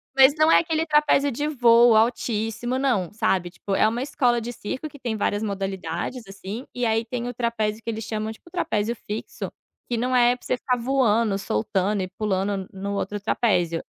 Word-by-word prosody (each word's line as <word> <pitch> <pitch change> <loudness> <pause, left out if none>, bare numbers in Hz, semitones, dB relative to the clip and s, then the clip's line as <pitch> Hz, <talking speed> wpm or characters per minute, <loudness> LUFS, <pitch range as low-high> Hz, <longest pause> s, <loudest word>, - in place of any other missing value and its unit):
Mas 270 +1 +7
não 310 +1 +5
é - - +7
aquele 325 -1 0
trapézio 300 -2 +3
de 290 +5 -2
voo 235 -4 +5
altíssimo 225 +1 0
não, 240 -10 0
sabe. 185 -4 0
Tipo, 195 +2 -4
é 215 - +4
uma 235 +3 -1
escola 245 -4 +1
de 240 +2 -5
circo 260 +7 -5
que 285 - -14
tem 235 -4 -2
várias 205 0 -1
modalidades 195 +3 -3
assim, 200 +5 -7
e 245 -1 -1
aí 225 0 +1
tem 240 0 -4
o 245 - -4
trapézio 225 -2 -1
que - - -4
eles 225 -1 -3
chamam, 215 0 -3
tipo, 280 +9 -14
trapézio 235 - -1
fixo, 210 +1 -6 0.4
que 240 - -1
não 250 +2 0
é 245 0 +5
para - - -18
você 250 - 0
ficar 250 0 0
voando, 230 -5 +2
soltando 190 - -1
e 185 - -2
pulando 195 -1 -2
no 200 +1 -4
outro 205 +1 -3
trapézio. 180 -6 +1
225 Hz, 195 wpm, -24 LUFS, 205-250 Hz, 0.4 s, Mas